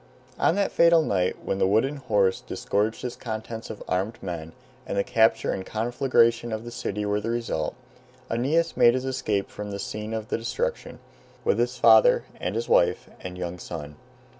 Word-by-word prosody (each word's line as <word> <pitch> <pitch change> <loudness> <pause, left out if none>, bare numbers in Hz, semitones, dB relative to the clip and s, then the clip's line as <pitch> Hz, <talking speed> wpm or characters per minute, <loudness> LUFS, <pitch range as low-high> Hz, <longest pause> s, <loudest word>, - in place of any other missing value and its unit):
On 165 - +3
that 200 -1 +1
fatal 170 -1 +5
night 90 -8 -1
when 95 - -1
the 95 - +3
wooden 115 +9 +2
horse 100 -7 +1
disgorged 110 +4 -2
its 125 - -4
contents 110 0 -6
of 110 - -7
armed 100 +6 -1
men, 80 -3 -6 0.3
and - - -3
the 100 - +3
capture 110 0 +3
and 95 - -3
conflagration 120 +1 +1
of 110 +1 -4
the 120 - -7
city 105 -3 -3
were 105 0 0
the 115 - -3
result, 115 -10 -2 0.5
Aeneas 150 +9 +1
made 120 +1 +6
his 130 0 -2
escape 110 -7 -1
from 105 0 -6
the 100 - -4
scene 105 +2 -5
of 110 -1 -5
destruction, 475 - -3 0.5
with 470 - +2
his - - 0
father, - - +6 0.2
and - - -3
his - - -2
wife, - - +2
and 90 0 -7
young 90 0 -5
son. 75 -3 -7
110 Hz, 180 wpm, -26 LUFS, 100-130 Hz, 0.5 s, made